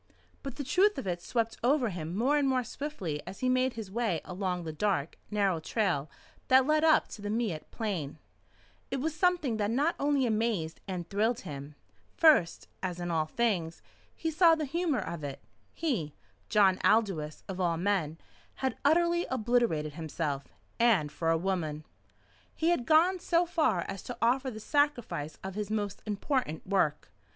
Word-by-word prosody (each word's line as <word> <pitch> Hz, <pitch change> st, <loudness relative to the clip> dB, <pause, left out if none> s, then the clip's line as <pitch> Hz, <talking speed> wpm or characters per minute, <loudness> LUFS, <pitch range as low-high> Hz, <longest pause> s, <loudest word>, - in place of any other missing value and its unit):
But 275 Hz, -3 st, -6 dB
the 285 Hz, -, -4 dB
truth 390 Hz, +10 st, +3 dB
of -, -, -4 dB
it 175 Hz, -2 st, -2 dB
swept 230 Hz, +3 st, -1 dB
over 255 Hz, -1 st, +3 dB
him 170 Hz, -2 st, -5 dB
more 265 Hz, +7 st, +3 dB
and 285 Hz, -2 st, +2 dB
more 255 Hz, -1 st, +1 dB
swiftly 215 Hz, -, -4 dB
as 190 Hz, -, -8 dB
he 255 Hz, -, +2 dB
made 255 Hz, 0 st, +2 dB
his 220 Hz, -4 st, -7 dB
way 220 Hz, -6 st, 0 dB
along 180 Hz, -1 st, -3 dB
the 160 Hz, -1 st, -5 dB
dark, 165 Hz, -3 st, -1 dB
narrow 200 Hz, -5 st, +1 dB
trail 160 Hz, -5 st, -1 dB, 0.4 s
that 260 Hz, 0 st, +6 dB
led 305 Hz, +2 st, +2 dB
up 315 Hz, -1 st, +5 dB
to 210 Hz, -, -9 dB
the 205 Hz, -, -4 dB
Miette 215 Hz, -8 st, -2 dB
Plain. 180 Hz, -11 st, -3 dB, 0.7 s
It 270 Hz, -, -2 dB
was 310 Hz, +4 st, -1 dB
something 340 Hz, -, +1 dB
that 205 Hz, -1 st, 0 dB
not 285 Hz, +9 st, +2 dB
only 285 Hz, -2 st, +2 dB
amazed 215 Hz, -8 st, -1 dB
and 180 Hz, -3 st, -4 dB
thrilled 220 Hz, +5 st, 0 dB
him. 145 Hz, 0 st, -8 dB, 0.4 s
First 300 Hz, -, +4 dB
as 180 Hz, -2 st, -3 dB
in 175 Hz, 0 st, -3 dB
all 160 Hz, -2 st, +1 dB
things 180 Hz, -6 st, -1 dB, 0.3 s
he 325 Hz, -, -2 dB
saw 330 Hz, +1 st, +6 dB
the 315 Hz, -1 st, -2 dB
humour 320 Hz, -1 st, 0 dB
of 170 Hz, -3 st, -6 dB
it. 140 Hz, -2 st, -5 dB, 0.3 s
He, 220 Hz, -, -2 dB, 0.3 s
John 195 Hz, -4 st, +4 dB
Aldous 190 Hz, -9 st, +1 dB
of 190 Hz, -1 st, -5 dB
all 170 Hz, -2 st, +1 dB
men, 175 Hz, -4 st, 0 dB, 0.4 s
had 265 Hz, -1 st, -2 dB
utterly 340 Hz, +3 st, +3 dB
obliterated 225 Hz, -, +1 dB
himself, 155 Hz, -3 st, -3 dB, 0.3 s
and 205 Hz, -11 st, +3 dB
for 165 Hz, +2 st, -1 dB
a 165 Hz, -, +3 dB
woman. 160 Hz, -4 st, -2 dB, 0.7 s
He 330 Hz, -, +1 dB
had 345 Hz, -, +3 dB
even 240 Hz, -, -8 dB
gone 345 Hz, +6 st, +4 dB
so 345 Hz, 0 st, +2 dB
far 320 Hz, -, +1 dB
as 195 Hz, +2 st, -5 dB
to 245 Hz, -, -6 dB
offer 260 Hz, +3 st, +2 dB
the 215 Hz, -3 st, -7 dB
sacrifice 230 Hz, -, 0 dB
of 190 Hz, 0 st, -5 dB
his 210 Hz, 0 st, -4 dB
most 205 Hz, -3 st, -2 dB
important 210 Hz, -, -1 dB
work. 185 Hz, -6 st, 0 dB
215 Hz, 175 wpm, -30 LUFS, 170-270 Hz, 0.7 s, that